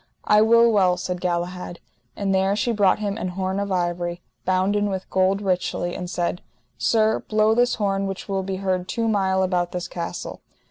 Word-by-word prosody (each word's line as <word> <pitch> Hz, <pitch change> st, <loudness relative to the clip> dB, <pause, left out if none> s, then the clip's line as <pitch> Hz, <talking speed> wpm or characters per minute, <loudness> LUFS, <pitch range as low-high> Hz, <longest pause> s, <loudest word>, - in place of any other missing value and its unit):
I 210 Hz, 0 st, +5 dB
will 230 Hz, +1 st, +5 dB
well, 185 Hz, -4 st, +3 dB
said 180 Hz, -1 st, -4 dB
Galahad. 175 Hz, 0 st, -3 dB, 0.4 s
And 195 Hz, -1 st, -1 dB
there 190 Hz, +1 st, +2 dB
she 235 Hz, +3 st, 0 dB
brought 205 Hz, -4 st, +3 dB
him 210 Hz, 0 st, -3 dB
an 185 Hz, -, -2 dB
horn 190 Hz, +1 st, -2 dB
of 200 Hz, -1 st, -3 dB
ivory, 175 Hz, -1 st, -2 dB, 0.2 s
bounden 195 Hz, +3 st, +1 dB
with 190 Hz, -1 st, -4 dB
gold 190 Hz, +2 st, +2 dB
richly, 180 Hz, -2 st, -1 dB
and 180 Hz, -1 st, -5 dB
said: 175 Hz, 0 st, -2 dB, 0.4 s
Sir, 220 Hz, -1 st, +2 dB
blow 215 Hz, 0 st, +2 dB
this 245 Hz, +2 st, +2 dB
horn 195 Hz, -2 st, 0 dB
which 195 Hz, 0 st, -6 dB
will 195 Hz, -1 st, -1 dB
be 190 Hz, 0 st, -3 dB
heard 185 Hz, -1 st, -1 dB
two 230 Hz, -1 st, -1 dB
mile 190 Hz, -3 st, +2 dB
about 180 Hz, -2 st, 0 dB
this 180 Hz, -1 st, -3 dB
castle. 170 Hz, -1 st, -6 dB
190 Hz, 185 wpm, -23 LUFS, 180-205 Hz, 0.4 s, I